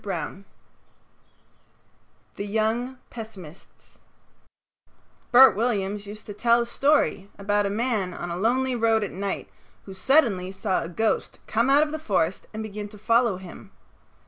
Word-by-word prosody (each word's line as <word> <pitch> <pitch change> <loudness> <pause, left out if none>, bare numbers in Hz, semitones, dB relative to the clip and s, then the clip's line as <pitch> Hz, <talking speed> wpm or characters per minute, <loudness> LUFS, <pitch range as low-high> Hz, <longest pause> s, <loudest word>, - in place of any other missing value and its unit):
XXV 190 0 -5 1.9
THE 200 - -5
YOUNG 225 +5 -1
PESSIMISTS 195 -8 -12 1.3
Bert 260 +2 +8
Williams 205 -2 -1
used 210 +1 -9
to 205 - -7
tell 235 +3 +3
a - - -1
story 255 -6 +1
about 205 0 +1
a - - -2
man 215 -3 -1
on 175 -1 -6
a - - -2
lonely 250 +6 +1
road 225 -2 +2
at 200 - -4
night 195 +1 -4 0.4
who 195 - -9
suddenly 195 -5 +2
saw 190 0 -1
a 165 - -5
ghost 220 +5 -1
come 230 +4 +1
out 285 +2 +6
of 300 - -3
the 315 - -4
forest 190 - -1
and 220 0 -5
begin 210 -1 -6
to 210 - -13
follow 230 -1 +2
him. 190 +1 -11
210 Hz, 145 wpm, -25 LUFS, 195-235 Hz, 1.9 s, Bert